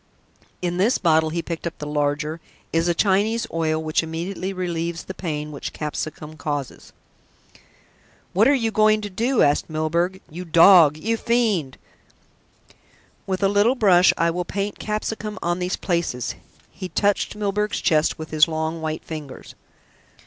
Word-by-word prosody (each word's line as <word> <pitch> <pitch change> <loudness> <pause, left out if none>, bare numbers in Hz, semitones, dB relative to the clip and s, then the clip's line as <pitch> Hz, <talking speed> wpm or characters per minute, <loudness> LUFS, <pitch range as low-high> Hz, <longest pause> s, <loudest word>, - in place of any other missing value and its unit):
In 175 0 -1
this 210 +7 +3
bottle," 160 -2 +3
he 165 +1 -3
picked 170 0 -4
up 170 - -6
the 150 - -6
larger, 150 +2 -1 0.3
"is 165 +1 +2
a 175 - +1
Chinese 210 +5 +2
oil 160 -1 0
which 155 0 0
immediately 175 +4 -4
relieves 170 -2 -3
the 190 - -7
pain 150 -5 -4
which 145 - -6
capsicum 155 0 -5
causes." 145 -4 -5 1.4
"What 210 +6 +4
are 285 - +5
you 230 -4 0
going 215 0 +3
to 205 -1 -6
do?" 235 +6 +2
asked 145 +3 +2
Milburgh, 160 +3 0
struggling. 190 -4 -19
"You 180 +1 -5
dog! 165 -2 +7
You 225 +8 -1
fiend!" 220 - 0 1.5
"With 190 +1 -2
a - - +5
little 205 +5 +3
brush 190 -6 +5
I 170 0 +2
will 180 +1 -2
paint 200 +3 -4
capsicum 215 0 -4
on 175 +1 0
these 180 +1 -1
places." 170 -9 -2 0.4
He 185 -2 -7
touched 205 +5 0
Milburgh's 210 0 -1
chest 155 -1 +2
with 160 0 -8
his 155 0 +5
long 160 0 -3
white 155 0 -3
ringers. 150 -4 -8
170 Hz, 155 wpm, -22 LUFS, 155-200 Hz, 1.5 s, dog